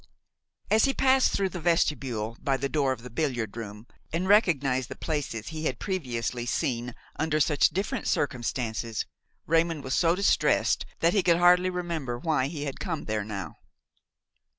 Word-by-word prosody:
As 220 Hz, +1 st, +5 dB
he 270 Hz, -, 0 dB
passed 265 Hz, 0 st, +4 dB
through 195 Hz, -1 st, 0 dB
the 180 Hz, -, -6 dB
vestibule, 135 Hz, -9 st, 0 dB
by 135 Hz, -1 st, +1 dB
the 140 Hz, +2 st, -1 dB
door 140 Hz, -2 st, +1 dB
of 120 Hz, -3 st, -4 dB
the 125 Hz, -, -8 dB
billiard 120 Hz, -6 st, -2 dB
room, 105 Hz, -1 st, -7 dB, 0.3 s
and 175 Hz, +3 st, -1 dB
recognized 140 Hz, -, +3 dB
the 130 Hz, -, -6 dB
places 145 Hz, -8 st, -3 dB
he 160 Hz, -1 st, -5 dB
had 130 Hz, -5 st, -1 dB
previously 125 Hz, -, -3 dB
seen 120 Hz, 0 st, -1 dB, 0.2 s
under 155 Hz, -1 st, +1 dB
such 150 Hz, -1 st, +4 dB
different 200 Hz, -, -3 dB
circumstances, 115 Hz, -4 st, -1 dB, 0.4 s
Raymon 165 Hz, -2 st, +1 dB
was 130 Hz, -, -3 dB
so 170 Hz, +2 st, +3 dB
distressed 200 Hz, +2 st, +2 dB
that 170 Hz, +1 st, +4 dB
he 205 Hz, -, +3 dB
could 170 Hz, -2 st, +3 dB
hardly 180 Hz, +1 st, +5 dB
remember 170 Hz, -9 st, -3 dB
why 135 Hz, -1 st, 0 dB
he 145 Hz, -1 st, -5 dB
had 140 Hz, -2 st, -5 dB
come 165 Hz, -4 st, -3 dB
there 105 Hz, -1 st, -1 dB
now. 100 Hz, -6 st, -6 dB
145 Hz, 165 wpm, -27 LUFS, 120-170 Hz, 0.4 s, As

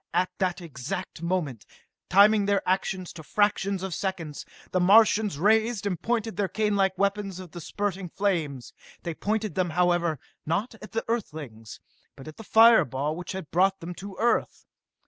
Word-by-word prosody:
At 180 Hz, +1 st, +2 dB
that 185 Hz, -1 st, 0 dB
exact 160 Hz, +3 st, -6 dB
moment, 170 Hz, -, -2 dB, 0.5 s
timing 200 Hz, +2 st, +5 dB
their 200 Hz, -1 st, +1 dB
actions 185 Hz, -1 st, -1 dB
to 165 Hz, -, -9 dB
fractions 200 Hz, +2 st, 0 dB
of 190 Hz, -2 st, -3 dB
seconds, 165 Hz, -5 st, -4 dB, 0.2 s
the 185 Hz, -, +1 dB
Martians 210 Hz, -1 st, +5 dB
raised 220 Hz, +4 st, +2 dB
and 185 Hz, -5 st, -2 dB
pointed 225 Hz, -1 st, -1 dB
their 200 Hz, -2 st, +1 dB
canelike 200 Hz, -2 st, +1 dB
weapons 200 Hz, -1 st, -1 dB
of 180 Hz, -3 st, -10 dB
the 175 Hz, -, -8 dB
spurting 195 Hz, +1 st, -3 dB
flames. 160 Hz, -10 st, -2 dB, 0.3 s
They 170 Hz, -, -3 dB
pointed 215 Hz, +2 st, -2 dB
them, 180 Hz, 0 st, 0 dB
however, 175 Hz, -1 st, +1 dB, 0.3 s
not 195 Hz, +10 st, -1 dB
at 215 Hz, -, -11 dB
the 225 Hz, -, -2 dB
Earthlings, 145 Hz, -, -5 dB, 0.4 s
but 135 Hz, 0 st, -12 dB
at 155 Hz, -, -10 dB
the 225 Hz, -, -9 dB
fire 225 Hz, +2 st, +7 dB
ball 140 Hz, +5 st, -3 dB
which 175 Hz, +2 st, -6 dB
had 190 Hz, -5 st, -7 dB
brought 190 Hz, +2 st, +3 dB
them 170 Hz, +2 st, -6 dB
to 195 Hz, +2 st, -9 dB
Earth! 235 Hz, +1 st, 0 dB
190 Hz, 165 wpm, -26 LUFS, 170-205 Hz, 0.5 s, fire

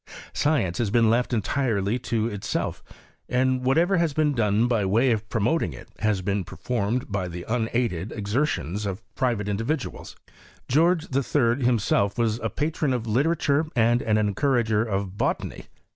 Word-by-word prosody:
Science 135 Hz, -, +1 dB
has 115 Hz, -4 st, +1 dB
been 115 Hz, 0 st, +4 dB
left 120 Hz, +2 st, +1 dB
entirely 115 Hz, -2 st, 0 dB
to 115 Hz, -3 st, -1 dB
itself; 100 Hz, -3 st, -3 dB, 0.5 s
and 130 Hz, 0 st, +1 dB
whatever 165 Hz, +9 st, +3 dB
has 170 Hz, -3 st, +1 dB
been 150 Hz, 0 st, +2 dB
done 110 Hz, -1 st, +2 dB
by 115 Hz, -4 st, +1 dB
way 115 Hz, +7 st, +3 dB
of 110 Hz, -1 st, -2 dB
pro 115 Hz, -, -1 dB
moting 110 Hz, -, +1 dB
it -, -, -12 dB
has 105 Hz, -3 st, 0 dB
been 100 Hz, 0 st, 0 dB
performed 115 Hz, +4 st, -2 dB
by 95 Hz, -2 st, -1 dB
the 85 Hz, 0 st, -7 dB
unaided 115 Hz, -5 st, -1 dB
ex 105 Hz, -2 st, -5 dB
ertions 105 Hz, -, -1 dB
of 100 Hz, +3 st, -5 dB
private 120 Hz, -6 st, -1 dB
individuals. 115 Hz, +8 st, -3 dB, 0.5 s
George 165 Hz, +4 st, +3 dB
III, 135 Hz, -2 st, +1 dB
himself 105 Hz, -4 st, +2 dB
was 115 Hz, -1 st, +1 dB
a -, -, -2 dB
patron 150 Hz, -2 st, -1 dB
of 120 Hz, -3 st, -2 dB
literature 145 Hz, +5 st, +1 dB
and 120 Hz, 0 st, +3 dB
an 110 Hz, -1 st, +1 dB
encourager 110 Hz, +1 st, +1 dB
of 100 Hz, -3 st, -3 dB
botany. -, -, -2 dB
115 Hz, 160 wpm, -25 LUFS, 105-130 Hz, 0.5 s, been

